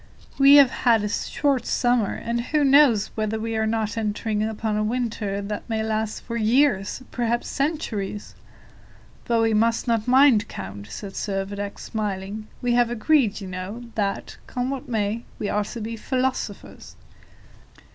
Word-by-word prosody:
We 275 Hz, +1 st, +8 dB
have 280 Hz, -3 st, +7 dB
had 230 Hz, -4 st, +2 dB
a -, -, 0 dB
short 270 Hz, +3 st, 0 dB
summer, 240 Hz, -4 st, +1 dB
and 235 Hz, +1 st, -2 dB
who 295 Hz, +5 st, 0 dB
knows 270 Hz, -7 st, +5 dB
whether 215 Hz, 0 st, -2 dB
we 225 Hz, +1 st, -3 dB
are 220 Hz, 0 st, +1 dB
not 220 Hz, 0 st, -1 dB
entering 210 Hz, 0 st, -1 dB
upon 220 Hz, 0 st, -2 dB
a 210 Hz, -, +1 dB
winter 215 Hz, -3 st, -2 dB
that 210 Hz, +3 st, -5 dB
may 220 Hz, -1 st, 0 dB
last 220 Hz, 0 st, -2 dB
for 235 Hz, -, -5 dB
years, 230 Hz, -1 st, +2 dB
perhaps 240 Hz, 0 st, -1 dB
for -, -, -6 dB
centuries?" 235 Hz, -9 st, -3 dB, 0.9 s
"But 230 Hz, -1 st, +2 dB
we 225 Hz, -1 st, +2 dB
must 230 Hz, +3 st, +2 dB
not 230 Hz, -1 st, +1 dB
mind, 255 Hz, -4 st, +5 dB
count," 100 Hz, +2 st, -8 dB
said 195 Hz, -, -7 dB
Servadac, 200 Hz, +1 st, -3 dB
smiling. 210 Hz, 0 st, -4 dB, 0.2 s
"We 245 Hz, -1 st, +2 dB
have 240 Hz, -1 st, +3 dB
agreed, 240 Hz, -2 st, +2 dB
you 195 Hz, -, -6 dB
know, 185 Hz, +6 st, -6 dB
that, 200 Hz, -2 st, -2 dB
come 250 Hz, +1 st, -2 dB
what 270 Hz, -2 st, -5 dB
may, 220 Hz, 0 st, -1 dB
we 205 Hz, -, -3 dB
are 210 Hz, 0 st, 0 dB
to 235 Hz, -, -7 dB
be 225 Hz, +1 st, -4 dB
philosophers." 255 Hz, +3 st, -3 dB
220 Hz, 160 wpm, -24 LUFS, 210-245 Hz, 0.9 s, We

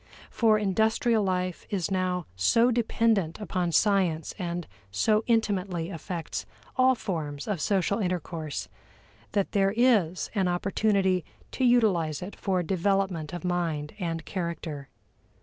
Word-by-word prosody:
For 220 Hz, -2 st, +4 dB
industrial 220 Hz, +2 st, +2 dB
life 185 Hz, -2 st, -2 dB
is 195 Hz, -2 st, -1 dB
now 185 Hz, -2 st, 0 dB
so 230 Hz, -, +4 dB
dependent 225 Hz, -7 st, +1 dB
upon 180 Hz, -3 st, -1 dB
science 180 Hz, -4 st, +2 dB
and 175 Hz, -2 st, -3 dB, 0.2 s
so 210 Hz, -, +2 dB
intimately 195 Hz, -7 st, 0 dB
affects 165 Hz, 0 st, -5 dB, 0.3 s
all 260 Hz, 0 st, +5 dB
forms 155 Hz, -10 st, -4 dB
of 200 Hz, -7 st, -2 dB
social 200 Hz, +3 st, +1 dB
intercourse, 170 Hz, -5 st, -3 dB, 0.7 s
that 200 Hz, -2 st, 0 dB
there 195 Hz, 0 st, +2 dB
is 210 Hz, -9 st, +3 dB
an 195 Hz, -4 st, +1 dB
opportunity 190 Hz, 0 st, +1 dB, 0.3 s
to 260 Hz, -, -2 dB
utilize 190 Hz, -, +3 dB
it 195 Hz, -, -7 dB
for 185 Hz, -2 st, 0 dB
development 185 Hz, -3 st, 0 dB
of 175 Hz, +1 st, -6 dB
mind 165 Hz, -4 st, -1 dB
and 165 Hz, -3 st, -3 dB
character. 170 Hz, -6 st, -4 dB
185 Hz, 125 wpm, -27 LUFS, 170-210 Hz, 0.7 s, all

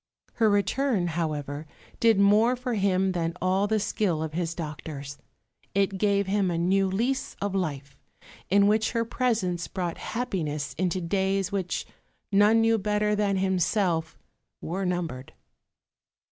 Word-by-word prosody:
Her 225 Hz, -2 st, +3 dB
return, 205 Hz, -1 st, +1 dB
however, 155 Hz, -3 st, -3 dB, 0.3 s
did 225 Hz, -3 st, +4 dB
more 210 Hz, +5 st, +5 dB
for 250 Hz, 0 st, -3 dB
him 190 Hz, -2 st, +2 dB
than 170 Hz, -1 st, -2 dB
all 190 Hz, +2 st, +1 dB
the 220 Hz, +1 st, +1 dB
skill 195 Hz, -6 st, 0 dB
of 155 Hz, -1 st, -5 dB
his 170 Hz, 0 st, -2 dB
doctors. 150 Hz, -3 st, -6 dB, 0.6 s
It 195 Hz, -1 st, +1 dB
gave 200 Hz, -1 st, +2 dB
him 195 Hz, -1 st, +1 dB
a 170 Hz, -, -1 dB
new 190 Hz, +3 st, +2 dB
lease 245 Hz, +8 st, -1 dB
of 200 Hz, -1 st, -2 dB
life, 145 Hz, -7 st, -3 dB, 0.5 s
in 200 Hz, +1 st, +5 dB
which 215 Hz, +3 st, +2 dB
her 230 Hz, -1 st, 0 dB
presence 220 Hz, -8 st, -1 dB
brought 175 Hz, -3 st, -4 dB
happiness 170 Hz, -, -3 dB
into 185 Hz, 0 st, 0 dB
days 195 Hz, +2 st, 0 dB
which, 190 Hz, -3 st, -2 dB, 0.5 s
none 210 Hz, +3 st, +5 dB
knew 225 Hz, 0 st, +3 dB
better 210 Hz, +1 st, +1 dB
than 205 Hz, -2 st, +1 dB
himself, 185 Hz, -3 st, 0 dB, 0.4 s
were 185 Hz, +3 st, -3 dB
numbered. 165 Hz, -8 st, -3 dB
190 Hz, 140 wpm, -27 LUFS, 170-210 Hz, 0.6 s, more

